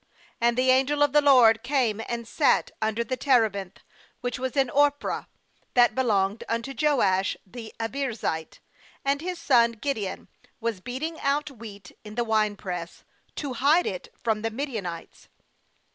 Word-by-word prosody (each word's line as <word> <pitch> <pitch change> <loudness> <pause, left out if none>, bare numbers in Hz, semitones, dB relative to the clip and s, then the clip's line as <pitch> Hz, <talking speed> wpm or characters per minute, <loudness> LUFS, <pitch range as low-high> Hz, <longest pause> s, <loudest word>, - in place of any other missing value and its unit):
""And 235 0 +2
the 255 0 +4
angel 275 +3 +3
of 290 -1 +2
the 295 - +6
LORD 250 -6 +6
came, 245 -5 0
and 235 -1 -4
sat - - +2
under 220 +1 0
the 255 +2 -3
terebinth 220 -8 +1 0.4
which 245 0 -3
was 260 +1 -3
in 265 -3 +2
Ophrah, 290 0 +1 0.5
that 245 -1 +5
belonged 210 -5 +1
unto 230 +4 -2
Joash 200 -11 +2
the 225 +2 -9
Abiezrite; 225 - -3 0.5
and 280 +1 +1
his 360 +1 -4
son 235 -7 +3
Gideon 220 -5 -4 0.3
was 230 -5 -3
beating 285 - -4
^ - - -12
out 290 +2 0
wheat 205 -6 -11
in 210 0 -10
the 240 - +1
winepress, 205 -6 -2 0.3
to 280 -4 -4
hide 290 +8 +3
it 185 -2 -5
from 220 -2 -1
the 225 - -1
Midianites. 220 - -6
235 Hz, 150 wpm, -26 LUFS, 215-275 Hz, 0.5 s, the